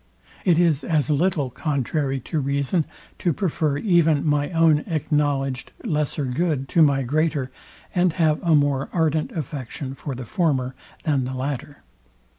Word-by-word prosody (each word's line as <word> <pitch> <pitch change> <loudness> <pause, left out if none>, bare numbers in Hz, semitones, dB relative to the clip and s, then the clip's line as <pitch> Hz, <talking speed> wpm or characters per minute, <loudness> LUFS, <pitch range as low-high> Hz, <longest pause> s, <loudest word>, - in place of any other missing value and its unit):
It 175 -4 +4
is 165 -4 +3
as 155 -4 +1
little 150 -3 +1
contrary 140 0 -1
to 155 - -2
reason 140 +4 0 0.3
to 175 - +1
prefer 155 -6 0
even 165 -5 +3
my 145 -1 +1
own 165 -3 +4
acknowledgeed 145 -4 0
lesser 150 -1 -1
good 135 +1 -1
to 170 - +3
my 140 -3 +4
greater, 145 0 0 0.4
and 180 -2 +2
have 155 -3 +2
a 165 -2 +3
more 145 -2 +1
ardent 160 -2 +1
affection 135 -2 -5
for 135 0 -6
the 125 0 -6
former 130 -3 0 0.3
than 140 -5 +1
the 130 +1 -4
latter. 140 +2 -4
150 Hz, 145 wpm, -23 LUFS, 135-160 Hz, 0.4 s, It